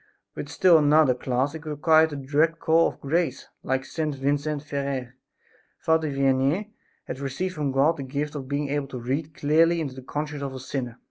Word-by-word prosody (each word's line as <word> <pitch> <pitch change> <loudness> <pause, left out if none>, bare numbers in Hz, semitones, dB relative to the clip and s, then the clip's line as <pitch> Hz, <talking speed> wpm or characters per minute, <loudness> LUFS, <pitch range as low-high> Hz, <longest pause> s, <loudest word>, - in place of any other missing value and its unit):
With 145 - -6
still 165 +2 +5
another 150 -2 +5
class 130 +2 -1
it 160 -1 -8
required 155 +1 +4
a - - -5
direct 145 +4 +1
call 165 0 +3
of - - -7
grace. 165 +5 -1
Like 130 0 -1
St. 155 -1 -3
Vincent 145 +2 -1
Ferrer, 140 -4 -3 0.6
Father 160 -1 +1
Vianney 140 +9 +1 0.3
had - - -6
received 140 +7 -3
from 150 -4 -2
God 145 +5 +3
the - - -5
gift 145 +3 -3
of 140 -3 -6
being 140 +1 -2
able 145 -1 -1
to 130 - -7
read 145 +6 -3
clearly 165 +3 +3
into 145 -5 -3
the 130 - -9
conscience 150 +2 -4
of 135 -1 -4
a - - -6
sinner. 125 -2 -5
145 Hz, 190 wpm, -25 LUFS, 135-155 Hz, 0.6 s, still